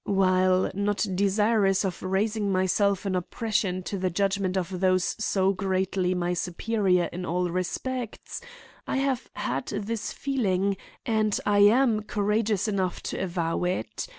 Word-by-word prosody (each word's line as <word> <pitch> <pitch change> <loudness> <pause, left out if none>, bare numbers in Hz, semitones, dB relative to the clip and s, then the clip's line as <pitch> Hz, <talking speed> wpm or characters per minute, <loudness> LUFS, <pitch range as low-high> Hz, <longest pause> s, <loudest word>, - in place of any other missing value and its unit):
While 185 -1 +3
not 200 +2 0
desirous 200 +1 +2
of 185 -2 -3
raising 200 +2 0
myself 190 +1 +1
in 190 -1 0
opposition 185 0 -1
to 195 +1 -4
the 185 0 0
judgment 195 +1 0
of 185 0 -2
those 185 -1 +2
so 195 -1 +2
greatly 190 -1 0
my 175 0 0
superior 180 +1 +1
in 180 +1 -5
all 180 0 -1
respects, 220 - -4 0.5
I - - -1
have 270 -2 -1
had 130 +3 -2
this 210 +2 -3
feeling, 200 -8 0 0.3
and 215 -2 +1
I 205 -1 +3
am 220 +2 +5
courageous 210 0 0
enough 190 -3 -1
to - - -3
avow 170 -2 -1
it. 180 - -3
195 Hz, 140 wpm, -26 LUFS, 185-210 Hz, 0.5 s, am